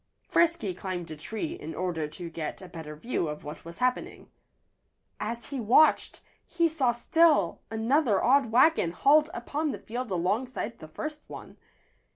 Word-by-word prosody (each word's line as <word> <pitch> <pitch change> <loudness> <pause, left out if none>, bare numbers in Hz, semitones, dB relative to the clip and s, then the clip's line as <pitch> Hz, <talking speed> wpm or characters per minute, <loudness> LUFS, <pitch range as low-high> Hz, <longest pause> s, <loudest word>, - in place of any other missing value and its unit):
Frisky 335 - +2
climbed 180 -2 -5
a - - -5
tree, 220 - -5
in 160 - -8
order 170 -3 -2
to 170 +3 -8
get 160 -2 -5
a 185 - -10
better 160 -3 -8
view 170 +1 -2
of 150 0 -6
what 150 +1 -8
was 170 0 -10
happening. 250 0 -2 0.9
As 235 +4 -5
he 275 - -3
watched, 245 +7 +4 0.2
he 340 -1 +1
saw 290 -6 +1
still 290 - +3
another 225 0 +2
odd 260 -1 +4
wagon 240 - +4
hauled 300 - +4
upon 310 -4 -3
the - - -3
field 245 +2 -5
alongside 210 +6 -2
the 155 - -10
first 305 - -6
one. - - -10
230 Hz, 160 wpm, -28 LUFS, 175-290 Hz, 0.9 s, watched